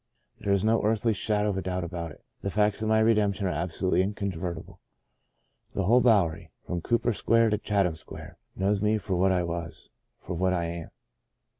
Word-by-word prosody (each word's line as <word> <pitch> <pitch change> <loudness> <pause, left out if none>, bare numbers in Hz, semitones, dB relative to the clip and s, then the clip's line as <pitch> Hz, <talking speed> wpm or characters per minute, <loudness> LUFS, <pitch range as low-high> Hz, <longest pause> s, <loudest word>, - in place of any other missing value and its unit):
There 100 - -1
is 100 -1 +2
no 110 +1 +3
earthly 110 +1 +1
shadow 105 0 0
of 95 - -3
a - - -1
doubt 90 -1 -2
about 85 -1 -4
it 75 - -15
— - - -46
the 100 - -2
facts 105 +1 +1
of 110 - 0
my 110 0 +4
redemption 105 -3 +2
are 90 - +1
absolutely 90 +2 0
incontrovertible. 95 -4 -4 1.0
The 100 - 0
whole 120 +7 +5
Bowery 100 -10 +2
— - - -44
from 85 -1 -3
Cooper 120 +4 +1
Square 115 +1 +3
to 105 - +1
Chatham 100 -5 +1
Square 80 - -10
— - - -46
knows 100 +1 +1
me 105 +1 +2
for 100 -3 -3
what 95 +2 +3
I 90 -1 +2
was, 85 -1 -6 0.3
for 90 - -6
what 90 +2 +1
I 85 -2 0
am. 85 -1 -5
100 Hz, 205 wpm, -27 LUFS, 90-105 Hz, 1.0 s, whole